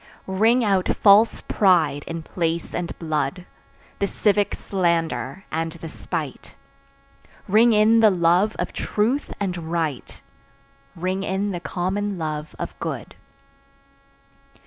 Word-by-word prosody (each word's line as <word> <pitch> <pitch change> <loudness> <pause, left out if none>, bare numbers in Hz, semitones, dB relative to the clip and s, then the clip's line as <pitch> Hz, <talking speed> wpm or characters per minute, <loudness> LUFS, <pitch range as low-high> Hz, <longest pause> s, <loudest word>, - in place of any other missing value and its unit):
Ring 220 +6 +3
out 195 -4 +2
false 210 +2 +5
pride 160 -8 +2
in 165 -1 -5
place 165 0 -2
and 175 -1 -4
blood, 155 +1 -2 0.5
The 200 - +1
civic 205 0 +1
slander 170 - -1
and 165 0 -2
the 165 -1 -8
spite; 155 -3 -6 0.9
Ring 220 +4 +5
in 220 +1 +5
the 220 -1 +7
love 180 +3 +2
of - - -3
truth 235 +7 -1
and 180 -5 -3
right, 160 -6 -3 0.8
Ring 185 +3 -2
in 195 +1 -1
the 175 - -4
common 190 +3 -2
love 155 -2 -4
of - - -5
good. - - -5
180 Hz, 120 wpm, -23 LUFS, 165-205 Hz, 0.9 s, the